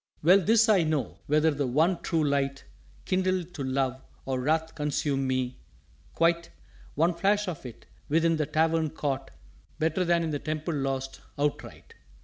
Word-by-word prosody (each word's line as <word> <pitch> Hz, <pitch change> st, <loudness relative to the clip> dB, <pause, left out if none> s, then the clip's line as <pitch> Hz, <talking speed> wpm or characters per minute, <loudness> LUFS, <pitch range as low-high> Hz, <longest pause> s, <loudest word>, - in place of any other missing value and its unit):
"_Well, 185 Hz, +4 st, +6 dB
this 225 Hz, +4 st, +4 dB
I 205 Hz, -4 st, +5 dB
know; 155 Hz, -6 st, -1 dB
whether 155 Hz, +2 st, +3 dB
the 145 Hz, -2 st, -1 dB
one 160 Hz, +8 st, +2 dB
True 160 Hz, -2 st, 0 dB
Light 140 Hz, -1 st, -1 dB, 0.4 s
Kindle 185 Hz, -1 st, +1 dB
to 165 Hz, -4 st, -7 dB
Love, 130 Hz, 0 st, -1 dB, 0.2 s
or 130 Hz, -1 st, -1 dB
Wrath 160 Hz, +4 st, 0 dB
consume 145 Hz, -2 st, -1 dB
me, 130 Hz, -1 st, -2 dB, 0.6 s
quite, 170 Hz, 0 st, +2 dB, 0.5 s
One 165 Hz, +4 st, +3 dB
flash 205 Hz, +4 st, +1 dB
of 160 Hz, -7 st, -5 dB
it 120 Hz, -, -12 dB, 0.2 s
within 165 Hz, +2 st, +3 dB
the 150 Hz, -2 st, -1 dB
Tavern 160 Hz, +1 st, +1 dB
caught 145 Hz, -3 st, -3 dB, 0.5 s
Better 160 Hz, +3 st, +1 dB
than 170 Hz, -1 st, +2 dB
in 160 Hz, -, -2 dB
the 145 Hz, -, -2 dB
Temple 155 Hz, +2 st, -3 dB
lost 135 Hz, -2 st, -3 dB, 0.2 s
outright. 145 Hz, 0 st, -3 dB
155 Hz, 155 wpm, -27 LUFS, 140-170 Hz, 0.6 s, Well